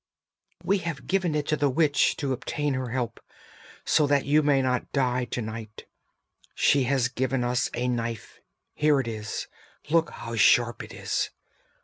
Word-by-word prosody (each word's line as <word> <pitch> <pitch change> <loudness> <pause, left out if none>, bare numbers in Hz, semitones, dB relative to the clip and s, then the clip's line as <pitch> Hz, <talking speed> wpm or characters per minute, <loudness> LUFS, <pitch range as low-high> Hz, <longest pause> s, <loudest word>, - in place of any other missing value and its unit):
_] - - -17
'We 200 0 +2
have 165 -5 -5
given 185 -5 0
it 150 -1 0
to 155 - +3
the 145 -1 +1
witch 145 +1 +2
to 135 -2 -2
obtain 145 +3 -2
her 130 -1 -3
help, 125 -1 -3 0.7
so 150 - +3
that 140 -1 +2
you 150 +2 +4
may 145 -2 +3
not 125 -1 -1
die 125 -2 +1
to 120 0 -4
night! 110 0 -8 0.7
She 140 -2 +3
has 130 -1 +2
given 130 0 -1
us 125 +1 0
a 125 +1 -1
knife; 115 -2 -3 0.3
here 150 -2 +3
it 130 - -2
is, 110 -1 -4 0.5
look 165 0 +3
how 115 - -8
sharp 120 +2 +4
it - - -11
is! - - -2
130 Hz, 170 wpm, -26 LUFS, 120-145 Hz, 0.7 s, you